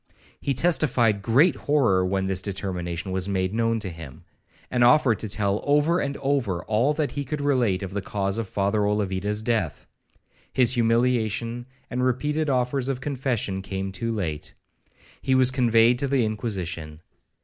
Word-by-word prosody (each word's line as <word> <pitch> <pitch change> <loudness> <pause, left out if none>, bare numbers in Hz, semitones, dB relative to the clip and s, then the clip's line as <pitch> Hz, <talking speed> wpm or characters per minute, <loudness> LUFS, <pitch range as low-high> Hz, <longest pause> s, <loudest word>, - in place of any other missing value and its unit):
He 140 - -1
testified 120 -10 +2
great 135 - +4
horror 120 -11 +2
when 95 +1 0
this 95 -1 -1
determination 95 -2 -4
was 95 +1 -2
made 95 0 -1
known 115 0 +1
to 100 - -3
him,—and 80 - -6
offered 125 -2 +5
to 110 - -4
tell 100 0 0
over 150 +5 +2
and 140 -3 -2
over 135 -8 0
again - - -17
all 115 +7 +2
that 150 -2 -1
he 145 - -3
could 150 +2 -4
relate 125 -10 +1
of 95 0 -6
the 100 - -2
cause 100 +2 -2
of 110 -4 -4
Father 100 +2 0
Olavida's 105 0 -1
death. 110 -9 -1 0.7
His 125 -1 +3
humiliation, 120 0 0 0.2
and 125 +1 -2
repeated 145 +5 0
offers 130 0 0
of 135 -2 -2
confession, 125 -8 -2
came 95 0 -4
too 115 +5 -3
late. 80 -9 -4 0.7
He 130 0 +1
was 130 0 +4
conveyed 120 -2 +3
to 140 - -1
the 135 -3 +2
Inquisition. 90 -8 -4
115 Hz, 160 wpm, -25 LUFS, 95-130 Hz, 0.7 s, offered